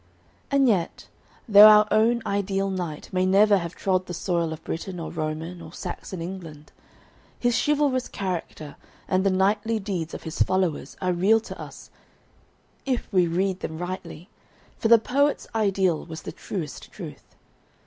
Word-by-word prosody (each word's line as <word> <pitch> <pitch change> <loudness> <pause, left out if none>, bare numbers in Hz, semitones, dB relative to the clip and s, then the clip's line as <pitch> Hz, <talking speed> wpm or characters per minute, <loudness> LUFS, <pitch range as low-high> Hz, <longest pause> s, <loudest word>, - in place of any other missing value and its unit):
And 275 -1 +3
yet, 185 -7 -1 0.4
though 210 -1 +10
our 210 0 +7
"own 225 +2 +3
ideal 195 -1 -1
knight" 175 -5 -5
may 185 0 +2
never 200 +2 +5
have 170 0 -6
trod 185 -1 0
the 175 - -5
soil 170 -2 -1
of 160 0 -7
Britain 180 +2 -5
or 165 - -5
Roman 160 +2 -4
or 160 -1 -10
Saxon 180 -1 -6
England, 165 -5 -8 0.7
his 245 -1 +1
chivalrous 285 -4 +1
character 175 -6 -5 0.3
and 185 0 +1
the 195 - +3
knightly 205 +4 +1
deeds 190 -6 -4
of - - -9
his 160 -1 -5
followers 185 -4 0
are 180 0 +1
real 195 +6 +4
to - - -9
us, - - -11 0.9
if 260 -3 -2
we 180 -2 +4
read 185 +2 0
them 160 - -5
rightly, 175 -1 -6 0.5
for - - -1
"the 230 +1 +8
poet's 280 +6 +1
ideal 195 -6 +1
was 160 -2 -9
the - - -6
truest 160 -8 -7
truth." - - -11
185 Hz, 160 wpm, -25 LUFS, 170-210 Hz, 0.9 s, though